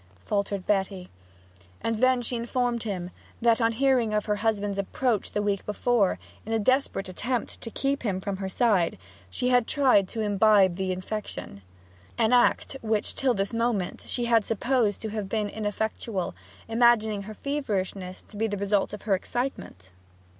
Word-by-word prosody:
faltered 200 -2 -1
Betty. 190 -2 -1 0.7
And 225 -1 -1
then 255 +1 +3
she 245 - 0
informed 240 0 -1
him 185 -5 -4 0.3
that, 230 0 +3
on 230 0 +3
hearing 245 -3 +2
of 210 - 0
her 210 -1 0
husband's 205 -2 0
approach 220 +2 0
the 210 - 0
week 200 -2 0
before, 210 -1 +1 0.3
in 225 - -4
a - - +3
desperate 255 -3 +1
attempt 240 +6 -3
to 230 - -6
keep 275 +4 -1
him 200 -6 -1
from 195 0 -3
her 190 0 -4
side, 195 -4 +2 0.3
she 250 - -1
had 245 -2 +3
tried 255 -9 +4
to 225 - -4
imbibe 205 -2 +4
the 190 -1 -1
infection 185 - -5 0.6
an 225 +1 +3
act 245 +2 +3
which 220 -2 0
till 260 -3 +1
this 200 +2 -1
moment 230 -5 -1
she 240 - -1
had 230 -2 +4
supposed 225 -1 0
to 220 - -2
have 210 -2 -4
been 210 -1 -1
ineffectual, 215 -2 -3 0.3
imagining 225 -3 +3
her 215 +2 -8
feverishness 195 -9 -3
to 210 - -13
be 225 +2 +1
the 205 -1 -3
result 200 0 +1
of 210 - -7
her 210 - +1
excitement. 190 - -3
215 Hz, 170 wpm, -27 LUFS, 200-240 Hz, 0.7 s, tried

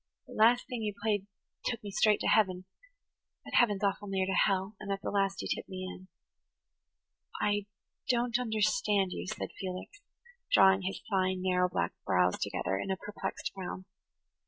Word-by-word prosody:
That - - -12
last 235 +3 +5
thing 245 -4 -5
you 210 -2 -2
played 205 -2 0 0.4
took 235 -1 -2
me 205 - -6
straight 215 +1 +4
to - - 0
heaven,–but 200 - -2
heaven's 210 -4 +3
awful 200 +1 0
near 190 -1 0
to 190 - -1
hell, 195 +2 +2
and 205 -1 -5
at 195 - -1
the - - -2
last 195 -1 0
you - - -3
tipped - - -3
me 185 -1 -5
in." 185 0 -9 1.3
"I 205 -1 0 0.4
don't 240 -1 +2
understand 215 - +1
you," - - -5
said - - -4
Felix, 190 - -6 0.5
drawing 190 0 +6
his 190 +1 -4
fine, 185 -2 0
narrow 180 -1 +2
black 85 - -1
brows 90 0 +2
together 95 - -1
in - - -4
a 190 - 0
perplexed 205 +2 -5
frown. 185 -1 -6
195 Hz, 165 wpm, -31 LUFS, 185-215 Hz, 1.3 s, drawing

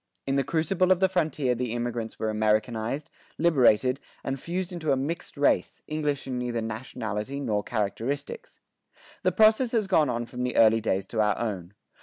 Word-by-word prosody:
In 135 - 0
the 135 - +2
crucible 170 +5 +1
of 185 - +4
the 190 - +4
frontier 155 -8 0
the 120 -1 -3
immigrants 120 -1 -3
were 110 - -1
Americanized, 110 +5 0 0.3
liberated, 130 -5 +4 0.2
and 135 0 -3
fused 180 +5 -3
into 160 -4 -1
a 135 - +3
mixed 155 +4 -4
race, 140 - +1
English 150 -2 -2
in 130 -2 -3
neither 120 -1 -2
nationality 110 +2 -4
nor 105 -7 0
characteristics. 120 - -3 0.6
The - - +2
process 220 +3 +4
has 220 -3 +2
gone 160 -7 +3
on 120 -1 -2
from 125 +1 -7
the 125 0 -1
early 115 0 +5
days 95 -3 0
to 110 +2 -1
our 105 -1 +2
own. 100 -5 -4
125 Hz, 175 wpm, -27 LUFS, 110-155 Hz, 0.6 s, early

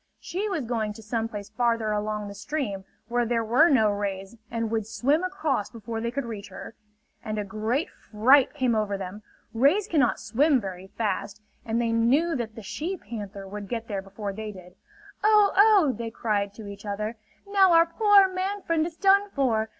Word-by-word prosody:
She 400 +4 -3
was 325 -10 -2
going 225 -3 -2
to 225 - -12
some 225 +1 -2
place 210 -2 -8
farther 230 -1 0
along 210 0 -2
the 200 - -7
stream 200 -4 -4 0.2
where 240 0 +1
there 230 0 0
were 250 +10 +4
no 220 -6 +4
rays 200 0 -4
and 230 -1 -2
would 220 -2 -1
swim 280 +9 +1
across 320 - -1
before 225 0 -6
they 235 - -1
could 265 +2 -3
reach 210 -3 -7
her. - - -9 0.5
And 215 0 -4
a 210 - -1
great 220 - -1
fright 255 +7 +3
came 255 -4 +1
over 210 -2 0
them. 195 +2 -7 0.3
Rays 285 - +3
cannot 275 -8 +2
swim 270 +5 +2
very 190 -3 -7
fast, 210 0 -3 0.2
and 230 0 -1
they 230 -1 0
knew 265 +9 +2
that 225 -4 -4
the 225 - -9
she 340 - -4
panther 205 - -8
would 205 0 -7
get 230 -1 -4
there 200 -3 -3
before 200 +1 -6
they 215 +1 -6
did. 180 -2 -13 0.5
"Oh, 420 -1 +5
oh!" 400 -7 +6
they 230 -1 -4
cried 205 -3 -2
to 220 - -9
each 200 0 -9
other. 210 +2 -3 0.3
"Now 390 -2 +5
our 330 0 +7
poor 400 +3 +5
man 380 +2 -3
friend 325 -1 +1
is 335 - -9
done 400 +1 +4
for. 230 - 0
230 Hz, 195 wpm, -26 LUFS, 210-300 Hz, 0.5 s, our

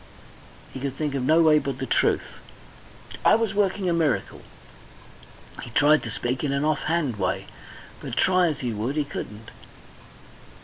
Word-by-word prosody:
He - - -6
could 135 0 -4
think 150 -1 -2
of 135 - -1
no 160 +6 +4
way 155 -1 +5
but 140 -3 -4
the 130 - -4
truth. - - +2 1.0
"I - - +6
was 225 -2 0
working 200 -1 0
a 175 - +2
miracle." 160 -6 -1 1.2
He - - -8
tried 145 +6 +4
to 115 - -6
speak 120 +4 -3
in 145 - 0
an 140 +2 0
off 155 -2 0
hand 155 -8 0
way, 95 0 -1 0.5
but - - -7
try 185 -1 +3
as 150 -2 -3
he 120 -3 -2
would 115 +7 -3
he 150 -2 0
couldn't. 105 -5 -8
145 Hz, 170 wpm, -25 LUFS, 125-160 Hz, 1.2 s, I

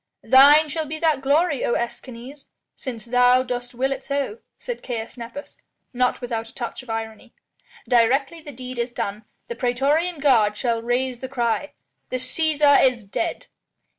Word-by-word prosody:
"Thine 290 +4 +7
shall 310 +1 -3
be 310 +2 -4
that 310 -4 +1
glory, 290 +1 +2
O 240 - +1
Escanes, 250 +3 -6 0.3
since 240 -4 -7
thou 250 +1 +4
dost 245 -1 -5
will 265 +3 0
it 270 0 -4
so," 280 - -3 0.2
said - - -6
Caius 230 -3 -5
Nepos, 245 +4 -9 0.4
not 250 0 0
without 230 -2 -4
a - - -20
touch 240 +1 -5
of 250 - -17
irony. 225 +1 -6 0.5
"Directly 270 +6 +2
the 300 -2 -9
deed 255 -1 -8
is 235 +1 -2
done, 210 -2 -4 0.2
the 475 - -4
praetorian 290 - 0
guard 225 -7 +3
shall 230 0 0
raise 245 +1 -1
the 260 - -6
cry: 245 +2 -1 0.4
'The 255 - -1
Cæsar 290 +2 +3
is 235 -4 -13
dead!'" 335 +12 -3
255 Hz, 165 wpm, -23 LUFS, 235-285 Hz, 0.5 s, Thine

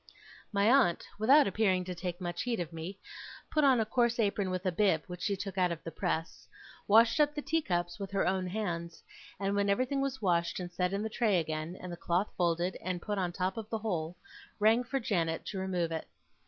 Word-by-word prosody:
My 200 -1 +2
aunt, 240 -8 +4
without 270 +7 +6
appearing 190 -2 +1
to 180 - -4
take 175 0 -5
much 175 -2 -3
heed 240 -4 -1
of 170 -1 -4
me, 165 +4 -6 0.5
put 305 - +2
on 265 -4 +5
a 220 - +2
coarse 235 +1 +1
apron 200 -3 +1
with 185 +1 -3
a 185 - +2
bib, 175 -4 +2
which 180 -1 -8
she 200 - 0
took 195 0 -5
out 180 -1 +3
of 165 - -5
the 165 - -6
press; 160 +1 -3 0.4
washed 225 +7 +5
up 295 0 +3
the 295 - -2
teacups 175 - -1
with 195 -1 -4
her 195 0 0
own 185 0 0
hands; 175 -4 -4 0.4
and, 200 0 0
when 200 0 +1
everything 255 +6 +1
was 270 -1 -2
washed 170 -4 +1
and 175 -1 -5
set 180 0 0
in 200 +1 -1
the - - -1
tray 215 -5 +2
again, 160 +2 -4
and 180 - -7
the 175 - -6
cloth 175 +4 0
folded 175 +1 0
and 180 -1 -2
put 205 -2 -2
on 180 -2 0
the 175 - -11
top 185 +2 -1
of 220 -1 -6
the 225 - -1
whole, 180 -6 -3 0.4
rang 220 +3 +4
for 270 +3 -2
Janet 170 -8 -1
to 195 - -4
remove 180 -3 -1
it. 160 -1 -4
190 Hz, 225 wpm, -31 LUFS, 175-220 Hz, 0.5 s, without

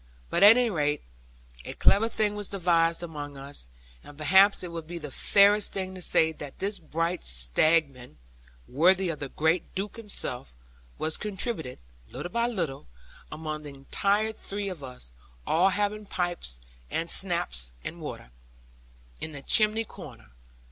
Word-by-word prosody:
But 170 - +1
at 210 +4 +10
any 245 -2 +2
rate, 150 -4 0 0.6
a - - -6
clever 225 +3 +4
thing 215 -2 0
was 205 -1 -5
devised 170 -3 +2
among 145 -4 -6
us; 140 - -9 0.4
and 145 - -13
perhaps 190 +6 +5
it 180 - -5
would 165 -2 -6
be 175 +1 -5
the 150 -4 -7
fairest 205 +5 +4
thing 190 -1 -3
to 185 - -9
say 160 -2 +3
that 145 -3 -9
this 200 +1 -2
bright 165 +2 -2
stratagem 125 - +1 0.5
(worthy 180 +7 +3
of 160 - -3
the 140 - -4
great 160 +4 0
Duke 200 +4 -3
himself) 125 - -3 0.4
was 155 0 -2
contributed, 195 - -3 0.3
little 175 - -6
by 235 +3 +1
little, 170 - -3 0.4
among 155 0 -5
the 150 - -8
entire 200 +10 0
three 200 -1 -5
of 170 -7 -7
us, 125 - -9 0.3
all 175 +4 +4
having 205 +1 -1
pipes, 175 - -2 0.3
and 165 - -2
schnapps 60 - 0
and - - -6
water, - - -7 0.9
in 155 - -6
the 140 -1 -9
chimney 215 +4 +3
corner. - - -12
170 Hz, 155 wpm, -28 LUFS, 145-200 Hz, 0.9 s, at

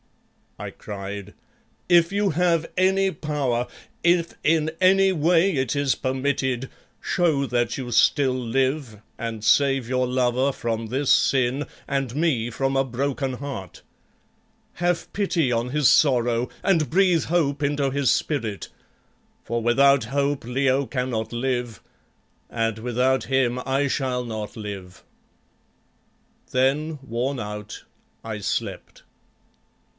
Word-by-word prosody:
I - - -6
cried, 100 0 -7 0.6
"if 170 -1 +5
you 200 0 +1
have 170 0 +1
any 190 +1 +3
power, 135 -7 -2 0.4
if 170 -1 +2
in 155 0 +2
any 195 +1 +5
way 175 +3 +3
it 130 -1 -1
is 140 -2 +1
permitted, 130 -1 -1 0.3
show 160 -6 +1
that 120 -1 0
you 125 -3 -5
still 130 +2 +3
live, 130 -1 -1 0.2
and 115 -2 -5
save 135 0 +3
your 130 0 +1
lover 125 +1 +1
from 115 -3 -3
this 130 +4 -1
sin 130 +2 +2 0.2
and 135 -3 -2
me 140 -8 +1
from 135 +3 -1
a 135 - +3
broken 135 +1 -2
heart. 125 - -7 0.9
Have 175 0 -1
pity 175 -9 +1
on 120 +1 0
his 150 0 +2
sorrow 120 -4 +3
and 170 -6 +2
breathe 180 -2 +3
hope 150 -4 0
into 140 -1 +1
his 140 -3 +2
spirit, 115 -10 -2 0.7
for 115 0 -2
without 135 +2 +4
hope 140 +2 -1
Leo 135 +2 +1
cannot 125 -4 -2
live, 120 -2 -2 0.7
and 115 -1 -1
without 125 +3 +1
him 125 -2 +1
I 135 +2 +1
shall 130 -2 -1
not 110 -3 -6
live." 100 -4 -8 1.5
Then, 145 +4 +1
worn 125 +2 -2
out, 105 0 -7 0.4
I 110 -2 -5
slept. 100 - -4
130 Hz, 120 wpm, -24 LUFS, 120-145 Hz, 1.5 s, if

